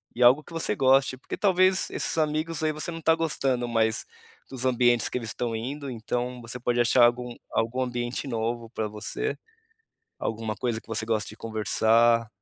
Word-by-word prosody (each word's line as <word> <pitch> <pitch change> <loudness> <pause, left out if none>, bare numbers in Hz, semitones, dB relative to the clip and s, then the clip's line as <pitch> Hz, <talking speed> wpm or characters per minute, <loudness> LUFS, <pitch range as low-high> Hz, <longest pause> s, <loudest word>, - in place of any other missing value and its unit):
e 125 - +2
algo 130 +5 +6
que - - -16
você 165 - -1
goste 135 0 +3
porque 130 - -7
talvez 185 -1 +3
esses - - -1
amigos 155 +1 0
aí 155 - +2
você 155 +3 -4
não 165 - -5
está 160 0 +3
gostando 135 -6 0
mais 110 -1 +1 0.5
dos 130 -1 -4
ambientes 120 -2 +3
que - - -2
eles 115 -3 -4
estão 115 +1 -3
indo, 135 +4 -5
então 120 +2 -3
você 120 +2 -7
pode 120 0 0
achar 120 +1 +5
algum 120 0 0 0.2
algum 115 +3 0
ambiente 120 +2 -3
novo 115 0 -2
para 110 -3 -2
você, 105 - -4 0.8
alguma 110 -1 -3
coisa 115 +1 -2
que - - -27
você 110 0 -2
goste 110 -4 -1
de 110 - -12
conversar, 115 +1 +2
120 Hz, 185 wpm, -26 LUFS, 115-135 Hz, 0.8 s, algo